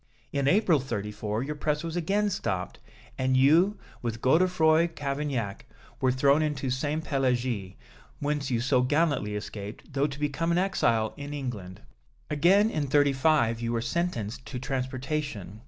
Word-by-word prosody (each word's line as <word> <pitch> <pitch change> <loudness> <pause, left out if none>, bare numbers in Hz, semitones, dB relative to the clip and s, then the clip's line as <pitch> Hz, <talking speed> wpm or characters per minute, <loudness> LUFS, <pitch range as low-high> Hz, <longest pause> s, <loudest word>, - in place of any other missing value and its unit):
In 140 -1 +1
April, 180 -2 +4
'34, 105 -2 -3
your 150 +3 -3
press 150 +1 -1
was 165 0 -4
again 200 +5 +1
stopped, 95 - -3 0.4
and 130 0 +2
you, 165 +10 +4 0.2
with 115 -2 -3
Godefroi 160 +3 +4
Cavaignac, 140 -7 -3 0.3
were 130 -1 +3
thrown 140 +3 +3
into 145 -4 -1
Sainté 145 +5 -1
Pélagie, 125 -9 -1 0.4
whence 145 -1 -1
you 120 -3 0
so 130 0 +3
gallantly 145 -6 +1
escaped, 105 +5 -7
though 140 +1 +2
to 140 -1 -8
become 150 +3 -1
an 170 - +2
exile 115 - +1
in 145 0 -6
England. 105 -10 -6 0.5
Again, 190 +9 +4
in 150 -2 -1
'35, 135 -4 +3
you 115 0 -1
were 115 - +1
sentenced 120 - -2
to 125 - -5
transportation. 130 - -3
140 Hz, 145 wpm, -27 LUFS, 120-155 Hz, 0.5 s, April